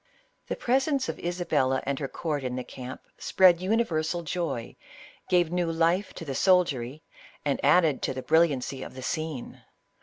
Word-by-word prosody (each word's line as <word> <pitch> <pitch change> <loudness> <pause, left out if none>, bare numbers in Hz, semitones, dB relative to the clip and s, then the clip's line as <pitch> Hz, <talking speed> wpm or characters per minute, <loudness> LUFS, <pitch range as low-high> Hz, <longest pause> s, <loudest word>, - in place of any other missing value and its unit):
The - - -2
presence 270 +2 +1
of - - -4
Isabella 165 -7 0
and 140 -1 -1
her 140 - -2
court 150 -1 -3
in 125 -1 -3
the 125 - -3
camp, 130 +1 -8 0.2
spread 180 -2 +4
universal 175 -5 0
joy, 165 -8 -3 0.5
gave 175 -2 +3
new 175 -2 0
life 170 +4 +1
to 165 - -7
the 140 - -4
soldiery, 150 -6 +2 0.4
and 140 -2 -1
added 150 -1 +4
to - - -1
the 130 - -5
brilliancy 140 -5 +2
of - - -8
the 130 - -7
scene. 155 -3 -4
160 Hz, 160 wpm, -27 LUFS, 135-180 Hz, 0.5 s, spread